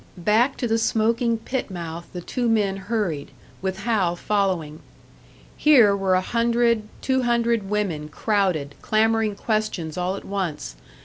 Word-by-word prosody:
Back 220 +9 +2
to 245 - -1
the 225 0 +1
smoking 230 +1 +1
pit 250 +3 -4
mouth 170 -2 -6
the 180 - -6
two 240 +6 -2
men 205 -4 +2
hurried, 190 -7 -2 0.3
with 190 +1 -3
Hal 200 -6 +1
following. 180 -6 -1 0.8
Here 245 -10 +5
were 195 -1 +1
a 185 - +2
hundred, 235 0 +1
two 260 -1 +1
hundred 235 -4 +1
women 180 -8 -2
crowded, 180 -6 0
clamouring 220 -1 +2
questions 200 -7 -2
all 180 +2 -1
at - - -9
once. 180 - -4
210 Hz, 140 wpm, -23 LUFS, 180-230 Hz, 0.8 s, Here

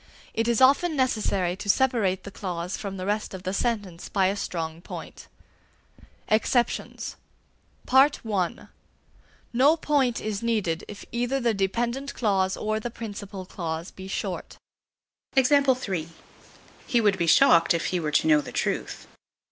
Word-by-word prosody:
It 225 +1 0
is 235 0 +2
often 285 +6 +5
necessary 205 -9 +1
to 205 0 -6
separate 210 -7 +2
the 200 - -8
clause 180 -2 -4
from 195 -2 -6
the 185 - -4
rest 210 -1 -2
of 185 - -9
the 185 0 -2
sentence 205 -6 -2
by 195 -2 +2
a 195 - -1
strong 165 -4 -4
point. - - -9 1.0
EXCEPTIONS. 230 +3 0 0.7
(I) 240 -7 +3 1.0
No 280 +7 +5
point 280 -6 +1
is 210 -2 -3
needed 210 -8 0
if 205 - -9
either 245 +3 0
the 235 -3 +1
dependent 235 +7 -1
clause 190 -4 +1
or 215 0 -1
the 240 - -4
principal 205 -4 -7
clause 170 -2 -5
be 190 0 -10
short. 195 - -4 2.3
He 240 - +3
would 205 -3 +3
be 170 - +1
shocked 170 -4 +6
if 170 - -2
he 180 - 0
were 155 -2 -2
to 150 - +2
know 150 -1 +5
the - - -9
truth. - - -2
205 Hz, 140 wpm, -26 LUFS, 185-240 Hz, 2.3 s, shocked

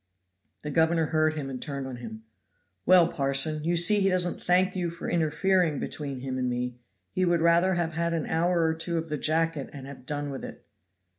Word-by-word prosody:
The 150 - -4
governor 165 +1 +2
heard 155 0 +1
him 145 -3 -4
and 130 -2 -6
turned 140 -2 -4
on 130 -2 -6
him: 110 -2 -9 0.6
"Well, 180 -2 +7
parson, 140 +1 +1
you 170 +2 +1
see 175 +5 +5
he 195 -1 +3
doesn't 180 -1 0
thank 185 +1 +2
you 175 -2 -1
for 170 0 -7
interfering 170 0 +1
between 140 -4 -5
him 130 -1 -4
and 125 -1 0
me. 125 0 -3 0.3
He 185 - -1
would 175 -1 +2
rather 170 +3 +3
have 170 -2 -1
had 170 +1 -1
an 160 - -2
hour 170 +1 +1
or 160 - +1
two 165 +1 -2
of 165 0 -4
the 150 - -2
jacket 160 -1 0
and 135 -2 -9
have 135 -2 -11
done 145 -1 -3
with 135 - -7
it." - - -10
160 Hz, 210 wpm, -27 LUFS, 140-170 Hz, 0.6 s, Well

